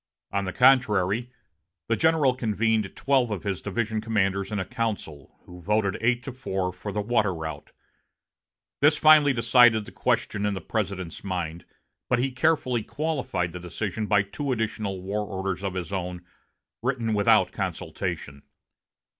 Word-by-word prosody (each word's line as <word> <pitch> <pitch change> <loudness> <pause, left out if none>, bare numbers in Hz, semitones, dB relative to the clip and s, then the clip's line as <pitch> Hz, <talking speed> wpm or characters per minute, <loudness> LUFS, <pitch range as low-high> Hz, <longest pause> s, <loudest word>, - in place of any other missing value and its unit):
On 100 0 -1
the 95 - -3
contrary, 120 -3 +3 0.6
the 115 - +2
general 160 -2 +3
convened 110 -3 0
twelve 130 -3 +2
of 105 -4 -4
his 100 -3 -2
division 110 +1 -2
commanders 100 -3 0
in 105 - -1
a 95 - -2
council, 100 - -4
who 90 0 -12
voted 100 +1 +1
eight 120 +1 +1
to 135 - -5
four 95 -8 -3
for 105 - -6
the 105 +1 -1
water 105 -2 +1
route. 80 -1 -6 1.1
This 150 +2 +4
finally 155 -2 +7
decided 115 -2 +5
the - - -11
question 100 - -1
in 105 -1 0
the - - -3
President's 95 -6 -4
mind, 85 -3 -4 0.4
but 125 - +3
he 130 +2 0
carefully 130 -3 +1
qualified 135 - -2
the 90 - -7
decision 105 +4 -4
by 105 -2 +4
two 135 +8 -4
additional 110 -4 -2
war 105 +3 -2
orders 95 -2 -4
of 95 -2 -3
his 95 +1 -4
own, 90 -2 -4 0.6
written 120 -2 -1
without 100 -1 +4
consultation. 70 0 -4
105 Hz, 155 wpm, -26 LUFS, 95-120 Hz, 1.1 s, finally